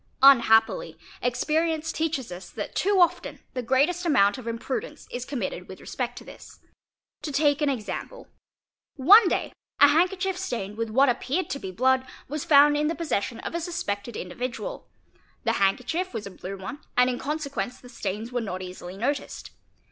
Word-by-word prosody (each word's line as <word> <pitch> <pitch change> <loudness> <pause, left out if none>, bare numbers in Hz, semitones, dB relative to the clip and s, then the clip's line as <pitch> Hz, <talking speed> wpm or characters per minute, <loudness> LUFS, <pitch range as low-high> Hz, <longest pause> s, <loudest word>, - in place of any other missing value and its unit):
Unhappily 240 - +5 0.2
experience 315 +5 0
teaches 315 - -2
us 175 0 -8
that 210 - -6
too 395 0 +2
often 350 -2 +2 0.2
the 255 - -2
greatest 280 +9 +2
amount 230 - +3
of 240 - -10
imprudence 260 - -4
is 245 0 -4
committed 225 -9 -4
with 190 - -10
respect 245 -1 -4
to - - -8
this. - - -13 0.6
To 300 - -4
take 290 +1 +2
an 295 - +3
example: 275 - -5 0.7
one 375 - +7
day - - -1 0.3
a 285 - +8
handkerchief 365 +4 +1
stained 230 - -4
with 230 0 -3
what 265 +6 +4
appeared 260 +8 -1
to 280 - -3
be 190 - -6
blood 255 +7 +2 0.2
was 295 +2 -4
found 295 -2 +6
in 300 0 +1
the 330 - -1
possession 255 -8 -2
of - - -5
a 340 - -2
suspected 235 - -4
individual; 250 - -5 0.6
the - - +1
hand 195 0 +4
kerchief 340 +9 -3
was 215 - -4
a 200 - -7
blue 190 +1 -7
one 190 +9 -7 0.2
and 250 0 +6
in 250 -1 -1
consequence 280 -4 -3
the 250 - -14
stains 215 0 -5
were 245 -1 -1
not 185 -4 -4
easily 180 0 -8
noticed. 275 +7 -3
260 Hz, 175 wpm, -26 LUFS, 225-315 Hz, 0.7 s, a